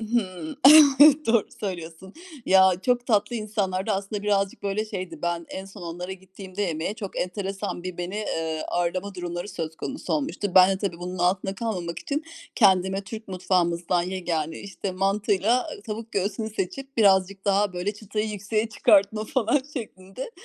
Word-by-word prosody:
Hımm. 225 - -2 0.7
Doğru 230 -2 +3
söylüyorsun. 180 -1 -6 0.3
Ya, 190 0 +6
çok 245 -1 +1
tatlı 210 0 +1
insanlardı 205 -2 -2
aslında 200 +1 -2
birazcık 200 -1 0
böyle 200 +2 -1
şeydi. 185 -7 -6
Ben 170 -1 -2
en 190 - -6
son 195 0 -12
onlara 175 +2 -5
gittiğimde 190 +1 -8
yemeğe, 170 +1 -2
çok 200 -3 -6
enteresan 195 0 -4
bir 180 -1 -6
beni, 190 +5 -3
ııı, 160 -1 -2
ağırlama 180 +3 -2
durumları 175 +1 -5
söz 160 -4 -5
konusu 270 - -5
olmuştu. 275 - -2
Ben 185 0 +8
de 190 - 0
tabii, 170 -3 -5
bunun 180 +1 -6
altında 185 +2 +1
kalmamak 185 -6 -3
için 295 +2 -3 0.3
kendime 190 -2 +4
Türk 220 +1 -8
mutfağımızdan 175 -1 +1
yegâne, 175 -4 -3
işte 195 0 -5
mantıyla 200 +4 +1 0.2
tavuk 225 +1 -6
göğsünü 205 +3 -2
seçip, 265 +7 -5
birazcık 195 -2 +3
daha 200 0 +2
böyle 180 +4 -2
çıtayı 210 +1 -3
yükseğe 215 +2 -2
çıkartma 215 0 +3
falan 240 +4 +1
şeklinde 205 - -7
195 Hz, 150 wpm, -25 LUFS, 180-215 Hz, 0.7 s, Ben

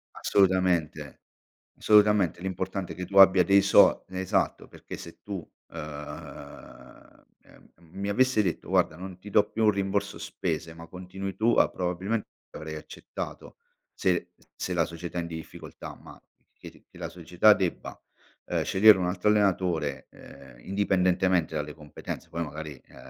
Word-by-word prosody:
Assolutamente, 95 -4 +1 0.6
assolutamente 105 -5 +4
l'importante 95 0 -4
è - - -12
che 90 -1 -5
tu 100 +1 0
abbia 95 -2 +8
dei 100 +3 +5
so 100 - +5
esatto, 95 0 -1
perché - - -10
se 85 - -11
tu 100 -5 -6 0.2
ehm, 75 -3 -10 0.2
ehm, - - -21 0.2
mi 100 +1 -4
avesse 125 +1 +3
detto: 90 -4 -3
"Guarda 80 - +2
non 90 +1 -9
ti 105 +3 -11
do 105 +1 +3
più 110 +1 -1
un 105 - +6
rimborso 100 0 -2
spese, 80 -1 -4
ma 85 0 -12
continui 95 +1 -7
tu, 115 +2 +2
a", - - +5
probabilmente 95 +5 -2 0.2
avrei 80 0 -7
accettato 75 - -8 0.4
se 90 -2 0 0.2
se 90 - -4
la 85 -2 +2
società 85 +1 -7
è - - +1
in 85 - -5
difficoltà, 80 -1 -9
ma - - -15 0.4
che - - -10 0.2
che - - -16
la - - -5
società - - +3
debba, - - -2 0.5
ehm, - - -1
scegliere 105 +1 +6
un 90 - -1
altro 90 +3 0
allenatore, 90 -9 +1
ehm, 65 -3 -15
indipendentemente 95 -3 +1
dalle 75 -1 -3
competenze, 75 -3 -8
poi 85 +1 -4
magari. 75 0 -7
ehm, - - -20
90 Hz, 150 wpm, -27 LUFS, 80-100 Hz, 0.6 s, abbia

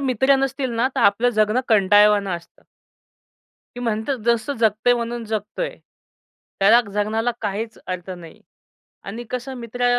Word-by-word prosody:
मित्र 265 0 +2
नसतील 270 -1 -1
ना 245 +3 +2
तर - - 0
आपलं 205 +5 +4
जगणं 215 +2 +2
कंटाळवान 205 -1 +4
असतं. 170 -2 -7 1.1
की 245 - -6
म्हणतात 230 +3 -2
जसं 235 +3 +1
जगतंय 220 +2 +3
म्हणून 235 0 -3
जगतोय. 215 - -4 0.8
त्याला 220 +5 +6
जगण्याला 220 +3 0
काहीच 220 +2 -4
अर्थ 185 0 -5
नाही 170 -3 -10 0.6
आणि 225 +5 -6
कसं 255 +1 -4
मित्र 245 +1 -3
225 Hz, 130 wpm, -21 LUFS, 205-245 Hz, 1.1 s, त्याला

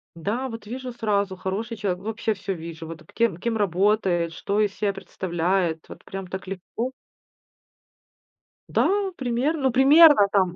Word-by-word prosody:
Да, 220 +10 -2
вот 225 -2 -8
вижу 255 +3 -6
сразу- 205 -5 -1
хороший 200 +5 -4
человек. 185 -3 -2
Вообще 220 +1 -1
всё 195 -1 -4
вижу, 165 -1 -8
вот 165 0 -9
кем 230 -7 +1
кем 225 +5 -2
работает, 190 -3 +1
что 200 +5 -2
из 210 -2 +2
себя 205 -1 0
представляет, 175 -3 -1
вот - - -12
прям 195 -1 -7
так 190 +1 -6
легко. 195 +6 -4 1.8
Да, - - +3 0.3
примерно 265 +5 0
ну, 265 - +3
примерно 275 -2 +7
там. 185 -3 +2
200 Hz, 150 wpm, -24 LUFS, 185-230 Hz, 1.8 s, примерно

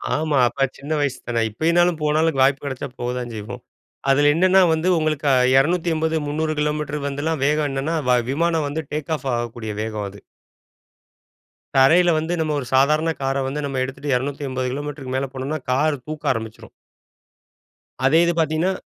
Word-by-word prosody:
ஆமா, 155 -2 0
அப்ப 135 +3 0
சின்ன 145 +3 -8
வயசு 140 -3 -1
தானே. 120 -1 0
இப்பைனாலும் 170 +6 +2
போனாலும் 155 0 +1
வாய்ப்பு 135 +1 +3
கிடைச்சா 140 0 -4
போத்தான் 125 -1 -3
செய்வோம். 105 -1 -7 0.5
அதில 145 +2 +4
என்னென்னா 185 +2 +5
வந்து 160 +3 -1
உங்களுக்கு 155 -2 -1
அ - - +5 0.2
280 160 +1 +1
300 155 +2 -1
கிலோமீட்டர் 150 -1 -2
வந்துலாம் 145 +2 -2
வேகம் 150 0 +1
என்னன்னா 135 +5 -2
வ 125 - +5
விமானம் 165 +1 +1
வந்து 160 +2 -3
டேக் 155 +1 -4
ஆஃப் 140 - -8
ஆகக்கூடிய 120 -2 -4
வேகம் 110 -2 -4
அது. 100 +1 -13 1.6
தரையில 160 +7 +5
வந்து 160 +2 -1
நம்ம 155 -1 -1
ஒரு 135 - -5
சாதாரண 150 +5 +3
கார 135 0 0
வந்து 145 +3 -3
நம்ம 135 -2 -3
எடுத்துட்டு 135 +2 -3
280 130 -1 -3
கிலோமீட்டருக்கு 145 -2 -5
மேல 135 - -1
போனோம்னா 135 +4 -3
கார் 145 +3 +2
தூக்க 155 -3 -1
ஆரம்பிச்சுரும். 110 -2 -7 1.4
அதே 150 +4 +5
இது 170 - +1
பார்த்தீங்கணா, 160 +4 +1
145 Hz, 155 wpm, -21 LUFS, 135-160 Hz, 1.6 s, என்னென்னா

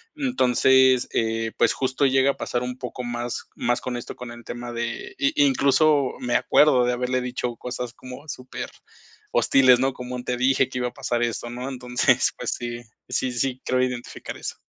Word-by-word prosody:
Entonces, 130 - +4
eh, 115 0 0
pues - - +3
justo, 130 +1 0
llega 135 +1 +4
a - - -11
pasar 120 - -2
un 125 0 -4
poco 125 0 -6
más 120 0 -4
más 120 +1 0
con 125 -1 -3
esto, 120 - -7
con 125 -1 -8
el 120 0 -11
tema 120 0 -6
de 120 - -4
i 280 +1 +1
incluso 145 - +3
me 120 -1 -1
acuerdo 145 -4 +5
de 125 - +2
haberle 125 +1 -1
dicho 125 -1 -3
cosas 125 0 -5
como 130 +3 -10
superhostiles, 130 -1 0
¿no?, 135 +1 +1
como: 125 0 -6
"Te 125 - -1
dije 130 +1 +3
que 125 - -4
iba 125 0 -1
a - - -21
pasar 120 -3 -1
eso", 120 0 -2
¿no?, 125 +2 -5
entonces, 125 -2 +1
pues - - -3
sí, 120 0 -4 0.3
sí, 130 -1 0
sí 130 +1 -2
creo 130 0 +1
identificar 125 -1 -4
eso. - - -5
125 Hz, 185 wpm, -24 LUFS, 120-130 Hz, 0.3 s, acuerdo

